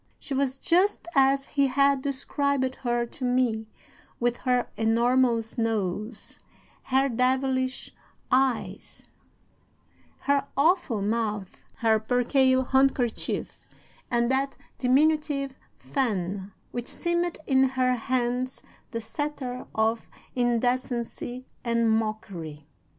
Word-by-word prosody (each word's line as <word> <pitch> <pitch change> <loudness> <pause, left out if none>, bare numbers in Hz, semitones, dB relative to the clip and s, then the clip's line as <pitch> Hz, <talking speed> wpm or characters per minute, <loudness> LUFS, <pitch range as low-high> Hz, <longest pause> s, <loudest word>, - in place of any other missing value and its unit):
She 280 - -6
was 270 -1 0
just 360 +6 +2
as 275 0 +4
he 280 -1 +2
had 275 +1 +3
described 280 -1 0
her 240 -1 0
to 245 +3 -10
me 245 -3 +1 0.5
with 240 0 +1
her 250 -1 +1
enormous 230 +1 +2
nose, 215 0 -2 0.5
her 270 +1 +3
devilish 260 +1 0 0.4
eyes, 260 -2 0 1.1
her 280 0 +1
awful 285 - +2
mouth, 210 -3 -2
her 220 -1 +3
percale 260 +3 +3
handkerchief, 265 -2 0 0.5
and 235 0 +2
that 270 +1 0 0.2
diminutive 280 +1 +2 0.2
fan 200 -7 -2 0.2
which 240 0 -4
seemed 345 0 -1
in 265 -1 +4
her 255 -1 +1
hands 250 +1 -1 0.3
the 230 -2 -4
sceptre 255 +1 -4
of 220 +1 0 0.2
indecency 245 0 -1 0.2
and 230 -1 +2
mockery. 195 -9 -3
255 Hz, 100 wpm, -27 LUFS, 230-270 Hz, 1.1 s, as